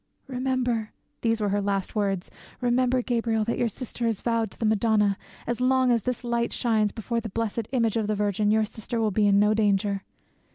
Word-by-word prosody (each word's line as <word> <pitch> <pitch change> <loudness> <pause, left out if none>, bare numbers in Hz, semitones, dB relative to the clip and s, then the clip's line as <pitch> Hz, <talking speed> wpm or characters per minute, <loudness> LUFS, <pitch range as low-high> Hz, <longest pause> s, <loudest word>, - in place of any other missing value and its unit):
'Remember,' 250 -4 -1 0.3
these 225 -1 +1
were 210 -1 0
her 205 +1 +1
last 200 -1 -1
words, 195 -4 -1 0.3
'remember, 250 +1 +2
Gabriel, 230 -3 0
that 230 - -1
your 240 - +2
sister 235 +1 -4
is 225 -3 -1
vowed 230 -2 0
to - - -15
the 225 - -2
Madonna. 215 -1 +3 0.3
As 240 +1 -2
long 260 0 +3
as 235 -1 +3
this 250 +4 -3
light 235 -1 0
shines 215 -3 +1
before 230 +1 -3
the 225 - -6
blessed 225 +1 -2
image 230 -4 +1
of 220 -2 0
the 215 - 0
Virgin, 205 0 +1
your 215 0 +3
sister 220 +2 -5
will 220 -2 +1
be 205 +1 +3
in 200 0 +4
no 210 +1 +4
danger. 200 -2 +1
225 Hz, 205 wpm, -26 LUFS, 210-240 Hz, 0.3 s, in